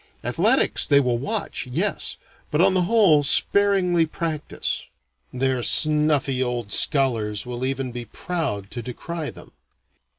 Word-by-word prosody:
Athletics - - +2
they 140 - +5
will 125 -3 0
watch, 205 - -3
yes, 170 +11 -1 0.3
but 150 - -1
on 190 +2 +4
the 185 - +2
whole 200 -10 +5
sparingly 180 +3 +3
practise. 160 -2 -4 0.4
Their 130 0 0
snuffy 150 -2 +2
old 120 -4 -2
scholars 110 -7 0
will 125 0 -5
even 135 -1 -2
be 120 0 -6
proud 125 - -4
to 120 - -5
decry 150 +7 -6
them. - - -13
140 Hz, 130 wpm, -23 LUFS, 125-170 Hz, 0.4 s, they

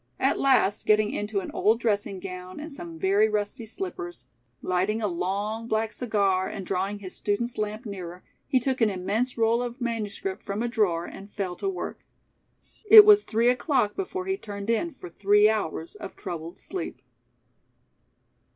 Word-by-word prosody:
At - - +2
last, 260 -7 +3
getting 215 0 +4
into 205 -1 -2
an - - -7
old 220 +2 +2
dressing 205 -4 -1
gown 185 +1 -7
and 305 0 -7
some 170 -10 -8
very 200 +5 +3
rusty 215 +3 -2
slippers, 360 - -6 0.4
lighting 185 +4 0
a 220 - -1
long, 200 +5 -2
black 220 0 0
cigar 200 -6 +1
and 195 -3 -6
drawing 195 +2 -1
his 190 -2 -9
student's 235 +4 -1
lamp 215 +3 -3
nearer, 180 -3 -7 0.2
he 265 -3 +3
took 260 0 -1
an 225 - +5
immense 205 +7 -1
roll 230 +1 +3
of 245 +1 -5
manuscript 235 - -3
from 200 +3 -3
a - - 0
drawer 195 -8 +1
and 200 +3 -10
fell 185 -3 -2
to 390 - -1
work. 380 - -5 0.9
It 430 -2 +12
was 420 0 +7
three 230 +2 +2
o'clock 250 -4 +1
before 375 -1 -4
he 385 0 -1
turned 205 - -4
in 320 +7 -1
for 180 - -9
three 205 +3 +4
hours 170 -7 -2
of - - -9
troubled 170 -3 -6
sleep. 375 - -6
215 Hz, 170 wpm, -26 LUFS, 195-240 Hz, 0.9 s, It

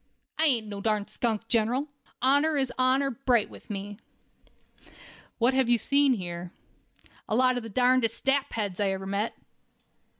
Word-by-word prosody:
"I 320 - +4
ain't 245 -7 +2
no 205 -1 -7
such 200 - -7
darn 215 -2 +1
skunk, 225 -2 -2
General. 240 +5 +1 0.4
Honor 285 +4 +3
is 265 -2 -1
honor 260 +2 +2
bright 245 -3 +1
with - - -14
me." 205 0 -6 1.4
"What 245 +2 +2
have 260 -2 +2
you 240 - +5
seen 280 +3 +3
here?" 175 -4 -6 0.8
"A 215 - +1
lot 255 +1 +3
of 245 - -2
the 225 - -8
darndest 250 0 +1
sapheads 225 -8 0
I 200 -1 +1
ever 190 0 -5
met." 200 +3 -2
235 Hz, 160 wpm, -27 LUFS, 210-265 Hz, 1.4 s, you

